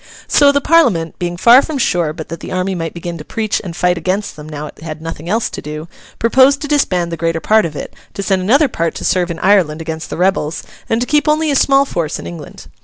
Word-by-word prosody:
So, 285 -1 +5
the 285 0 +1
Parliament, 240 - +2
being 175 0 -3
far 240 +7 +7
from 310 0 -4
sure 175 - +1
but 160 0 -8
that 165 - -6
the - - -8
army 185 +1 -1
might 165 -2 -4
begin 170 0 -6
to - - -7
preach 215 +4 -2
and 175 -4 -7
fight 180 0 +1
against 190 +5 -2
them 150 0 -10
now 150 -1 -6
it - - -11
had 155 0 -7
nothing 165 +1 -7
else 225 +3 +1
to - - -6
do, 150 +2 -7 0.3
proposed 265 +4 +4
to - - -3
disband 185 - +1
the 165 - -4
greater 165 0 -1
part 215 0 +3
of 150 - -11
it, - - -6 0.2
to 200 - -3
send 190 -1 +1
another 275 +11 +4
part 165 -9 -2
to - - -5
serve 180 -1 +1
in 170 - -4
Ireland 180 -5 +2
against 160 0 -5
the - - -5
rebels, 175 -3 0 0.3
and 225 +1 +1
to - - +1
keep 300 +3 +1
only 310 0 +2
a - - +1
small 275 +1 +4
force 165 - -3
in - - -9
England. 85 0 -9
180 Hz, 250 wpm, -16 LUFS, 165-235 Hz, 0.3 s, far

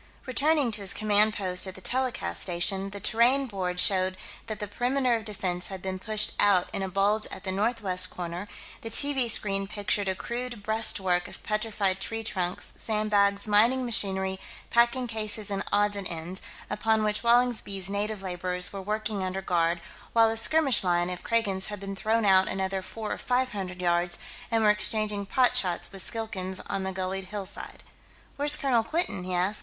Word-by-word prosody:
Returning 280 0 +2
to 210 - -3
his 195 - +1
command 215 0 +4
post 185 -1 0
at 190 - -7
the - - -9
telecast 235 - -1
station, 190 +3 -1
the 200 +1 -8
terrain 240 +7 +3
board 185 -6 -3
showed 185 -1 +3 0.3
that 215 - -4
the 210 - -4
perimeter 245 +4 +1
of 225 -2 -4
defense 185 -4 -4
had 190 -1 -7
been 185 0 -5
pushed 215 +2 -1
out 195 -3 +3
in - - -2
a 190 - -2
bulge 205 +3 +2
at - - -9
the 190 - -2
northwest 195 -3 +2
corner; 175 +2 -6 0.3
the 225 - -6
TV 265 0 +4
screen 195 -2 +2
pictured 205 0 -1
a 190 - 0
crude 240 +1 -5
breast 220 0 +2
work 180 -2 0
of - - -11
petrified 210 -3 -1
tree 225 +3 -4
trunks, 185 -4 -2
sandbags, 210 -2 +1
mining 235 +5 +4
machinery, 190 -4 0 0.3
packing 235 +2 +3
cases 215 -2 0
and 195 -1 -1
odds 205 0 +2
and 200 -2 -4
ends, 170 +3 -4 0.3
upon 220 0 +1
which 210 0 0
Wallingsby's 235 -5 +1
native 200 0 -3
laborers 180 0 -1
were 195 - -5
working 210 0 -2
under 190 +1 -3
guard 170 -2 +1 0.3
while 225 -1 +5
a - - -2
skirmish 270 +1 +5
line 175 0 +1
of 180 - -6
Kragans 200 -5 0
had 205 -1 -6
been 195 0 -6
thrown 220 +2 0
out 190 -1 +5
another 190 0 -2
four 215 +3 -6
or - - -3
five 255 +1 0
hundred 185 -3 -5
yards 175 0 +1 0.3
and 225 -1 +1
were 210 - +6
exchanging 210 -1 0
pot 250 +2 +2
shots 185 -8 0
with 195 -1 -5
Skilkans 190 -5 -4
on 195 -1 -2
the 190 0 -2
gullied 190 +1 -3
hillside. 200 0 -7 0.5
"Where's 290 +1 +5
Colonel 255 -6 +1
Quinton?" 270 - -1
he 185 -1 -2
asked. 185 +4 0
205 Hz, 185 wpm, -27 LUFS, 190-225 Hz, 0.5 s, were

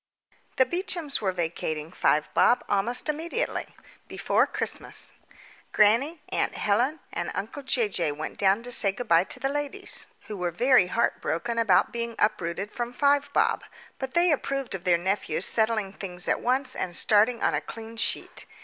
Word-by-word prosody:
The 260 - +4
Beechams 345 - -2
were 195 -3 +1
vacating 160 -3 -3
Five 150 -4 +1
Bob 245 - +4
almost 230 +8 0
immediately 330 +10 -2 0.4
before - - +1
Christmas. - - -1 0.6
Grannie, 265 +10 +3
aunt - - -1
Helen, 250 +9 +1
and 175 - -3
uncle 225 +8 -5
Jay 255 -4 +1
Jay 170 -6 -1
went 155 +2 -6
down 200 +3 +3
to 245 - -6
say 200 -4 +5
good 245 +3 -6
bye 170 -1 +4
to 255 - -3
the 270 - 0
ladies, 290 +8 -2
who 215 - -8
were 180 -1 -1
very 240 +2 +4
heartbroken 230 +1 -1
about 200 -6 +3
being 235 -1 -4
uprooted 200 -1 -1
from 240 0 -4
Five 285 +2 +2
Bob, - - +1 0.4
but 265 +2 -5
they 345 0 +4
approved 275 -3 -2
of 185 -2 -6
their 175 -2 +4
nephew 190 +4 -1
settling 220 -3 +2
things 180 -2 -3
at - - +1
once 255 +2 0
and 180 -2 -3
starting 220 +3 +3
on - - +2
a - - 0
clean 225 0 -9
sheet. 230 - -2
225 Hz, 165 wpm, -26 LUFS, 190-265 Hz, 0.6 s, say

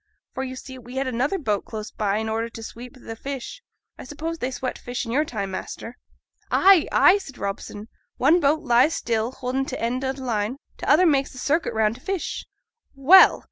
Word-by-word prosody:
For, 265 - -3
you 260 -1 -5
see, 260 0 -9
we 245 +1 -11
had 270 +1 0
another 260 +8 0
boat 210 - -1
close 215 -1 -7
by 205 -1 -1
in 220 +1 -2
order 225 +1 -2
to 230 -1 -10
sweep 240 +3 -9
th' 225 -3 -9
fish. 275 - -6 0.4
(I - - -7
suppose 320 +5 -5
they 250 - -1
swept 255 0 -4
fish 245 0 -4
i' 230 - -5
your 295 +5 +2
time, 200 -7 -4
master?)' 225 +5 -6 0.5
'Ay, 380 -3 +5
ay!' 390 +3 +6
said 275 -10 -11
Robson; 200 +1 -5 0.3
'one 305 +7 +4
boat 310 0 +2
lies 250 +4 +4
still 225 0 -1
holding 260 +1 -2
t' 265 - -5
end 245 +3 -2
o' 265 - 0
t' 270 - -12
line; 235 -1 -2 0.2
t' - - -6
other 315 +6 +5
makes 275 -5 +2
a - - -11
circuit 290 -2 0
round 220 +1 +1
t' - - -18
fish.' 385 +1 -4 0.5
'Well! 315 +8 +7
255 Hz, 210 wpm, -24 LUFS, 230-285 Hz, 0.5 s, Well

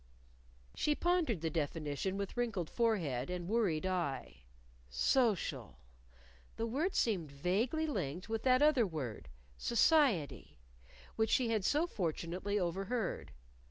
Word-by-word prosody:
She 300 - +1
pondered 335 - +1
the 165 -1 -1
definition 155 +4 -2
with 200 -1 -4
wrinkled 220 -9 -2
forehead 175 - 0
and 180 -1 -4
worried 195 -7 +1
eye. 140 - -3 0.4
"Social" 210 - +1 0.8
the 225 - -2
word 290 - -1
seemed 180 -10 0
vaguely 205 - 0
linked 180 - -3
with 225 -1 -2
that 255 +2 +4
other 285 -8 +4
word, 130 - -5 0.3
"Society", 235 - +2 0.6
which 220 0 +2
she 255 -4 +2
had 220 -3 +1
so 295 - +2
fortunately 185 - -2
overheard. 195 +4 -2
200 Hz, 120 wpm, -34 LUFS, 165-240 Hz, 0.8 s, that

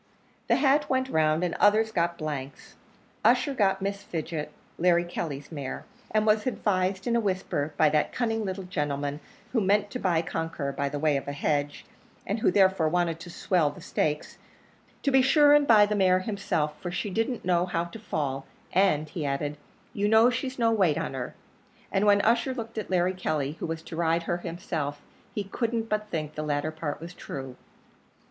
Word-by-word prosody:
The - - +4
hat 290 +1 +3
went 260 0 +1
round, 155 -1 +2
and 175 - 0
others 215 +2 +4
got 170 -3 0
blanks. 145 -3 -6 0.5
Ussher 250 +5 +4
got 195 -5 +1
Miss 200 0 -2
Fidget, 160 -5 -4 0.3
Larry 175 0 +4
Kelly's 155 -5 -5
mare, 140 -4 -5 0.2
and 215 0 +1
was 215 +2 +3
advised 190 -5 0
in 235 - +1
a - - +4
whisper 185 -8 -2
by 155 - +5
that 150 0 +1
cunning 225 -2 -1
little 190 -1 -4
gentleman 145 -4 -2 0.3
who 230 - +2
meant 205 +1 +2
to 250 - -4
buy 170 -5 +1
Conqueror 165 -4 -3
by 140 +1 -2
way 145 0 +1
of 135 - -6
a 145 - -3
hedge, 145 0 -1 0.4
and 205 +4 -2
who - - +3
therefore 190 -4 +3
wanted 170 -1 0
to 170 +1 -9
swell 170 -2 +1
the 145 - -11
stakes 150 -1 -2 0.6
to 280 - +2
be 265 0 +6
sure 290 +2 +6
and 295 -1 +5
buy 215 -3 +7
the 210 - -2
mare 185 -2 +3
himself, 180 -7 -2
for 175 - -4
she 180 +3 -3
didn't 225 +3 -1
know 180 0 +2
how 170 -1 -1
to 175 +6 -9
fall; 140 -9 -3 0.3
"and," 170 -5 +3
he 160 0 -4
added, 145 +1 -2 0.4
"you 205 0 0
know 220 +3 +6
she's 255 +1 -3
no 230 -2 +3
weight 185 -9 +3
on 165 - -3
her;" 130 -2 -5 0.6
and 200 +2 +2
when 205 0 +6
Ussher 235 +4 +2
looked 225 -2 -5
at 210 - -6
Larry 180 0 +2
Kelly, 155 -6 -1
who - - -3
was 160 0 -4
to 165 - -8
ride 165 0 +1
her 175 - -1
himself, 165 -5 -4 0.4
he 205 - -1
couldn't 225 +3 -2
but 215 0 -1
think 155 -4 -3
the 155 - -4
latter 150 0 -1
part 155 -2 -4
was 170 +2 -8
true. 135 -6 -7
180 Hz, 195 wpm, -27 LUFS, 155-210 Hz, 0.6 s, buy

